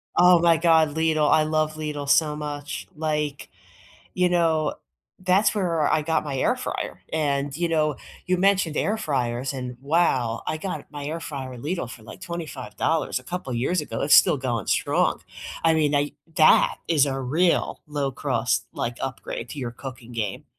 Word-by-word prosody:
Oh 180 0 +7
my 170 -1 +4
god, 160 -2 +4
Lidl, 160 -2 +2
I 155 - +5
love 155 0 0
Lidl 150 -2 -5
so 150 0 +3
much. 145 -1 -5
Like, 150 -2 -2 0.7
you 180 0 +3
know, 165 -3 +1 0.4
that's 185 +4 +3
where 170 -6 +1
I 155 - +2
got 160 0 0
my 140 -2 -3
air 130 - +2
fryer, - - -4
and, 145 -2 -1
you 170 -1 -1
know, 155 -3 +1 0.3
you 185 - +2
mentioned 185 -4 +2
air 215 +2 0
fryers, 130 - -1
and 125 -2 -6
wow, 135 -6 +1
I 155 - -2
got 155 -4 -5
my 145 -1 -7
air 165 +2 -4
fryer 135 -5 -6
at 120 - -10
Lidl 150 -4 -3
for 115 - -11
like - - -11
$25 160 -3 -2
a - - -15
couple 175 -8 -4
years 150 +9 0
ago, 115 -6 -5
it's 145 - +5
still - - +6
going 120 -6 -2
strong. - - +1 0.4
I 165 - +5
mean, 150 -2 +2
I 145 0 +1 0.2
that 155 - +5
is 150 -4 +3
a 135 -1 -2
real 160 +7 +1
low-cost, 145 -3 -1
like, 120 +1 -3
upgrade 125 -2 -5
to 150 - -7
your 125 -3 -3
cooking 125 -1 -9
game. 105 -4 -3
150 Hz, 175 wpm, -24 LUFS, 135-165 Hz, 0.7 s, Oh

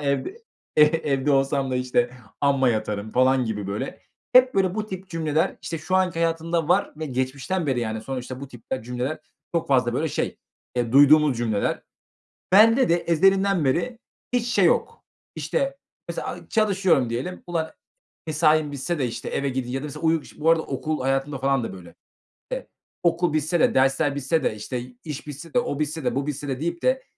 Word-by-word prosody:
evde 140 - -1 0.4
e 150 - +8
evde 150 -3 +2
olsam 135 0 +2
da, 130 - 0
işte, 125 -1 +1 0.3
amma 140 -2 +3
yatarım" 110 -2 -2
falan 130 0 +3
gibi, 105 -3 -3
böyle. 100 +1 -5 0.3
Hep, 255 0 +6
böyle, 190 -2 +2
bu 215 0 -2
tip 190 -2 -7
cümleler, 160 +1 0
işte, 165 -1 -4
şu 185 +4 0
anki 185 -3 +1
hayatımda 165 -1 0
var 185 +3 +2
ve 155 - -4
geçmişten 135 +7 -2
beri, 130 -3 +1
yani, 110 -1 -3
sonuçta 130 +1 -6
bu 140 - -7
tipte 125 0 -6
cümleler 125 +5 -3 0.4
çok 170 - 0
fazla, 125 -3 +3
böyle, 160 +4 0
şey, - - -3 0.4
eee, 120 -1 0
duyduğumuz 145 0 +6
cümleler. 110 -4 -1 0.7
Bende 225 +6 +6
de 170 - +5
ezelinden 190 +1 +2
beri 225 - 0 0.3
hiç 245 -1 +1
şey 240 - +3
yok, - - +1 0.3
işte, 275 0 -1 0.3
mesela, - - -4
aaa, - - -7
çalışıyorum 190 - +2
diyelim. 130 +11 -4
"Ulan, 165 -2 -2 0.6
mesaim 155 -1 +3
bitse 145 +4 -3
de, 130 - +1
işte, 115 - -5
eve 140 0 -1
gidi 130 -1 -3
ya 135 +1 -2
da - - -5
mesela 150 +1 -8
uyu 160 -1 +2
ş" - - -16
Bu 155 +2 +2
arada 165 -1 +3
okul 150 +3 -3
hayatımda 135 +2 0
falan 135 -2 +1
da, 95 - -5
böyle. 85 -3 -12 0.6
Eee, - - -4 0.4
okul 170 -1 +2
bitse 155 +2 +1
de - - +4
dersler 135 +2 +2
bitse 145 +3 0
de, - - 0
işte, 110 +4 -4 0.2
iş 150 -1 -6
bitse 150 +3 -9
de, 245 - +4
o 145 -11 -3
bitse 155 +1 -2
de, - - 0
bu 140 +2 -1
bitse 145 0 -4
de, 135 -1 -3
deyip 170 +1 -2
de 260 +1 +2
145 Hz, 190 wpm, -24 LUFS, 130-170 Hz, 0.7 s, e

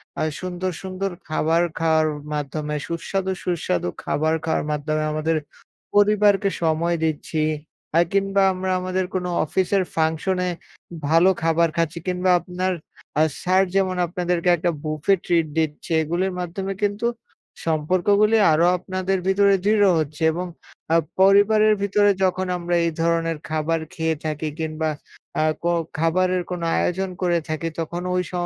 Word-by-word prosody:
অ্যা - - -1 0.2
সুন্দর, 185 0 -3
সুন্দর 190 0 -3 0.2
খাবার 160 +2 +2 0.2
খাওয়ার 160 -1 +3 0.3
মাধ্যমে, 150 +1 -3
সুস্বাদু, 190 +3 -2
সুস্বাদু 155 - -1
খাবার 155 +2 0
খাওয়ার 160 -2 0
মাধ্যমে 155 +1 -1
আমাদের 155 +1 0 0.6
পরিবারকে 205 -1 +4
সময় 165 +2 +1
দিচ্ছি। 155 0 -1 0.6
আ - - +7
কিংবা 195 0 +2
আমরা 185 0 -2
আমাদের 185 0 -1
কোনো 180 -1 -1 0.2
অফিসের 190 +4 +1
ফাংশন 160 +4 0
এ - - 0 0.6
ভালো 165 +4 +5
খাবার 165 +1 +3
খাচ্ছি, 165 0 0
কিংবা 180 0 +1
আপনার 185 +1 -2 0.4
অ্যা 155 - +4 0.2
স্যার 185 +1 +3
যেমন 190 -1 +2
আপনাদেরকে 180 0 -1
একটা 175 +2 0
বুফে 155 +4 +1
ট্রিট 165 -2 +2
দিচ্ছে। 155 0 -2
এগুলির 175 +4 -1
মাধ্যমে 190 +3 -3
কিন্তু 205 +3 0 0.6
সম্পর্কগুলি 185 +7 +2
আরো 160 +2 +4
আপনাদের 185 +1 -2
ভিতরে 200 +1 +4
দৃঢ় 205 -1 +4
হচ্ছে। 155 +1 -3
এবং 180 +3 -3 0.4
অ্যা 165 - +4 0.2
পরিবারের 210 +2 +5
ভিতরে 205 0 +3
যখন 185 0 +1
আমরা 175 0 -1
এই 165 - +1
ধরনের 165 -1 +1
খাবার 160 +1 0
খেয়ে 160 0 0
থাকি 155 0 -2
কিংবা 160 0 -2 0.5
অ্যা 155 - +2 0.2
কো 170 - +2 0.3
খাবারের 180 +2 +2
কোনো 175 -2 -3
আয়োজন 190 +2 0
করে 175 -2 +2
থাকি 155 +1 -2
তখন 170 +2 -3
ঐ - - 0
স - - -14
175 Hz, 140 wpm, -22 LUFS, 160-190 Hz, 0.6 s, আ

